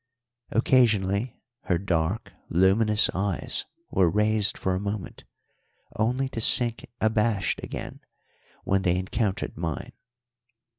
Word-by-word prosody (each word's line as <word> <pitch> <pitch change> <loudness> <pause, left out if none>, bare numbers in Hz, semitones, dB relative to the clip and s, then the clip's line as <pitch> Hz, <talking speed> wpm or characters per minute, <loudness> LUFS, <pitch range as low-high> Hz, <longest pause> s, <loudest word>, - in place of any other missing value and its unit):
Occasionally 115 -3 +1 0.3
her 90 -4 +1
dark, 90 +3 -2 0.2
luminous 105 +5 +3
eyes 95 -1 -2 0.3
were 95 -3 +3
raised 105 +2 +1
for 95 - -1
a 90 - -1
moment, 100 -1 -6 0.7
only 125 +5 0
to 115 - -4
sink 120 0 +6
abashed 110 -2 0
again - - -7 0.6
when 95 0 +1
they 90 -2 +1
encountered 95 +2 -2
mine. 80 -3 -5
100 Hz, 105 wpm, -25 LUFS, 95-110 Hz, 0.7 s, sink